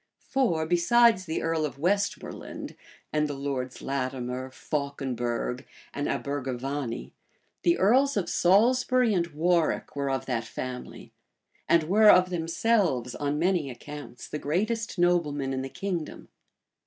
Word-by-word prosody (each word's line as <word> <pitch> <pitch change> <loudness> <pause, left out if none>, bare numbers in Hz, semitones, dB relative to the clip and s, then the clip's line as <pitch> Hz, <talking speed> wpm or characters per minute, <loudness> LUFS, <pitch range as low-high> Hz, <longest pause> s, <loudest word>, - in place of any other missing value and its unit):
For, 200 -13 +1
besides 185 +4 +4
the 160 -2 -3
earl 165 -1 0
of 140 -3 -3
Westmoreland, 200 +7 -2 0.4
and 150 0 +2
the 145 - -4
lords 135 -2 -4
Latimer, 130 -1 -3
Fauconberg, 130 -4 -3 0.3
and 145 - -2
Abergavenny, 135 - -3 0.5
the 170 -1 +3
earls 260 +6 +3
of 195 - 0
Salisbury 240 +5 +3
and 170 -3 +1
Warwick 170 +1 0
were 140 -1 -1
of 135 0 -1
that 120 -3 -1
family, 125 +2 -7 0.6
and 170 -1 +5
were 210 +6 +5
of 180 -1 +6
themselves, 165 - +1
on 145 0 -2
many 170 -3 +1
accounts, 125 -1 -9
the 150 - -5
greatest 215 +10 -1
noblemen 150 -6 +1
in 130 - -2
the 135 - -5
kingdom. 175 -1 -5
155 Hz, 130 wpm, -27 LUFS, 135-185 Hz, 0.6 s, of